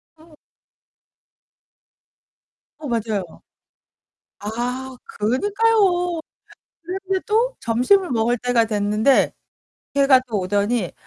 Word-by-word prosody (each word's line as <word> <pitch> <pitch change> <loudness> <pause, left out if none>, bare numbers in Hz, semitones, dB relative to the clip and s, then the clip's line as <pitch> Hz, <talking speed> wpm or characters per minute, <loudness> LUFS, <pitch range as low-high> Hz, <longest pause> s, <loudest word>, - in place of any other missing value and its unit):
어. 315 -1 -20 2.4
어, 300 - -6
맞아요. 215 -7 -3 1.0
아, 250 +5 -4
그니까요. 360 - +1 0.7
그런데 385 +1 -2
또 465 +4 +1
점심을 255 - +2
먹을 235 +1 +1
때가 245 -1 +2
됐는데 210 +4 +2 0.6
걔가 275 -2 +5
또 215 -3 -1
오더니 205 +1 0
250 Hz, 165 characters per minute, -21 LUFS, 220-355 Hz, 2.4 s, 걔가